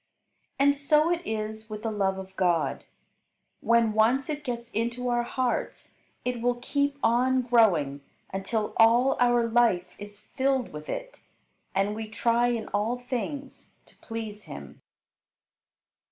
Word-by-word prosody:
And 285 0 +4
so 300 +3 +3
it 345 -1 0
is 220 0 -4
with 215 0 -7
the 225 - -1
love 195 -2 0
of 190 0 -9
God. 175 -3 0 0.7
When 230 -2 +3
once 245 +7 +2
it 295 0 -5
gets 240 -3 -5
into 235 +3 -2
our 240 0 +2
hearts 245 +1 -3 0.3
it 250 -2 -2
will 245 +1 +2
keep 280 +3 -1
on 255 +2 +3
growing 180 - +3 0.3
until 210 +3 -2
all 235 +4 +5
our 240 -1 +4
life 225 -7 +2
is 205 0 -9
filled 260 - -1
with 150 0 -8
it, - - -5 0.6
and 195 +2 +1
we 220 0 -6
try 235 +2 +2
in 235 -2 -2
all 215 +4 0
things 255 +3 -6
to - - -18
please 220 -2 -7
Him. 70 -1 -10
235 Hz, 140 wpm, -27 LUFS, 210-250 Hz, 0.7 s, all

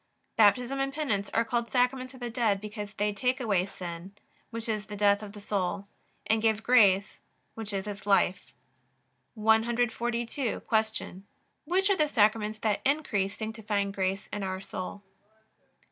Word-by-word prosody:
Baptism 245 +5 +4
and 270 0 0
Penance 265 -9 -1
are 230 - +1
called 235 -1 -1
Sacraments 255 +1 +1
of 260 - -14
the 240 -1 -3
dead, 225 -4 +1
because 210 0 -7
they 210 0 0
take 250 +6 0
away 200 -7 +1
sin, 180 +1 -8 0.3
which 230 0 -6
is 215 -2 -2
the 210 - -6
death 205 0 +3
of 205 -1 -8
the 210 - -9
soul, 200 -1 -2 0.4
and 220 0 +2
give 220 -1 +2
grace, 205 -6 +4 0.3
which 220 -2 -6
is 195 0 -2
its 205 -1 -7
life. 195 -2 +2 0.8
142. 235 +2 +1
Q. 220 -3 -1 0.4
Which 380 +5 +2
are 390 - +3
the 305 - +3
Sacraments 215 -3 +2
that 215 -1 0
increase 230 -9 0
sanctifying 215 -2 -2
grace 195 0 -1
in 205 - -2
our 190 -1 -3
soul? 195 +1 -6
215 Hz, 155 wpm, -29 LUFS, 200-240 Hz, 0.8 s, Baptism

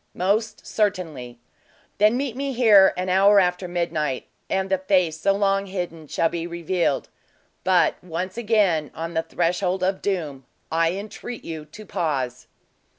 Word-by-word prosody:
"Most 215 +4 0
certainly." 165 - -2 0.6
"Then 215 +3 +4
meet 265 -3 -2
me 275 +1 -2
here 215 -6 +6
an 185 +1 -2
hour 195 +2 +5
after 180 0 +1
midnight, 155 -6 -2 0.2
and 190 0 0
the 190 -1 +1
face 180 -4 +1
so 195 +5 +3
long 195 0 +1
hidden 175 -4 -5
shall 165 - +1
be 170 0 -4
revealed. 170 -3 -1 0.5
But, 185 -1 +2
once 180 +2 -4
again, 205 -10 +2
on 165 +1 -5
the 160 - +1
threshold 180 +3 -1
of 190 +1 0
doom, 150 -10 -3 0.2
I 165 +1 +2
entreat 215 +4 -7
you 160 -2 -6
to 210 +8 -12
pause." 135 -9 -2
180 Hz, 150 wpm, -23 LUFS, 165-200 Hz, 0.6 s, here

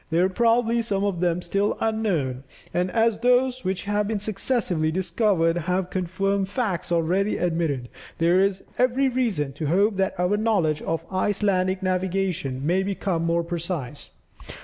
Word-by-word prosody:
There 170 +2 +3
are - - +1
probably, 235 +2 +2
some 200 -3 -1
of 200 -4 -1
them 175 0 0
still 200 +4 0
unknown, 180 - -1 0.3
and 180 +1 0
as 225 +1 +2
those 250 +1 +2
which 185 -1 -2
have 205 0 0
been 220 0 -1
successively 200 -6 -1
discovered, 180 -1 +1
have 180 +2 -1
confirmed 195 +2 -1
facts 200 -7 -2
already 175 +5 +1
admitted, 165 -7 -1 0.3
there 170 +2 +3
is 195 0 +1 0.2
every 255 +2 +3
reason 220 - -1
to 150 +2 -4
hope 200 +6 +2
that 190 -1 -1
our 180 +3 +2
knowledge 195 -9 +1
of 165 0 -3
Icelandic 190 -1 0
navigation 185 -7 -1
may 180 +4 +2
become 190 -3 -1
more 170 0 +1
precise. 170 -5 -5
190 Hz, 150 wpm, -24 LUFS, 170-210 Hz, 0.3 s, There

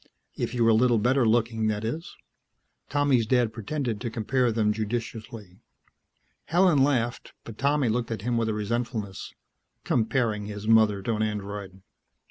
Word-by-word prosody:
If 125 - -3
you 120 - +2
were 115 - +5
a - - +5
little 120 +1 +4
better 125 +3 +2
looking, 115 -1 +1
that 105 0 -1
is." 155 +9 -5 0.7
Tommy's 140 -6 +2
dad 120 -2 +2
pretended 115 0 -3
to 120 - -2
compare 120 +2 0
them 110 -1 +1
judicially. 110 -2 -5 0.9
Helen 170 -5 +4
laughed, 125 -4 -1
but 115 -2 -11
Tommy 140 -1 +2
looked 115 +1 -1
at 110 -3 -4
him 120 +1 0
with 115 -1 0
a - - 0
resentfulness. 110 -2 -4 0.5
Comparing 110 -3 0
his 105 0 -7
mother 110 -3 +4
to 115 - -1
an - - -2
Android.... 100 -2 -4
115 Hz, 155 wpm, -26 LUFS, 105-125 Hz, 0.9 s, were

